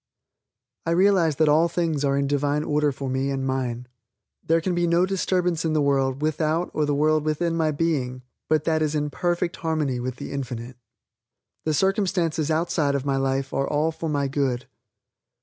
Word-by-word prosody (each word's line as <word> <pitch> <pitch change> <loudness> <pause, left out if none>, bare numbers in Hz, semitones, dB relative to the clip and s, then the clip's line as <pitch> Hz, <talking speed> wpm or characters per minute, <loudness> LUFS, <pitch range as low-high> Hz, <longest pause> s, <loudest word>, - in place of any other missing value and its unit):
I 165 +1 +2
realize 185 -5 +4
that 155 +2 +3
all 155 +3 +4
things 165 -4 -1
are 140 -1 +2
in 140 - +1
Divine 145 +1 0
order 150 -1 +1
for 135 0 -6
me 130 +1 -1
and 135 -1 -2
mine. 125 -2 -2 0.6
There 165 +1 +2
can 180 +2 -1
be 175 0 +1
no 170 +2 +3
disturbance 180 -3 0
in 160 -1 0
the 155 - +2
world 135 -1 +1
without 155 +2 0
or 150 -1 0
the 145 - +1
world 155 +1 +2
within 165 +2 0
my 160 -1 +1
being 145 -5 -1 0.3
but 155 -1 +2
that 160 0 +1
is 155 0 0
in 150 -1 -1
perfect 175 +1 -1
harmony 155 -6 -1
with 125 0 -3
the - - -7
Infinite. 125 -3 -5 0.9
The 155 -1 +1
circumstances 180 -4 +1
outside 155 -3 +1
of 140 -1 -2
my 135 -1 +1
life 135 0 -1
are 135 - 0
all 150 +2 +1
for 160 0 -5
my 140 -2 0
good. 135 -2 -1
150 Hz, 185 wpm, -24 LUFS, 135-165 Hz, 0.9 s, realize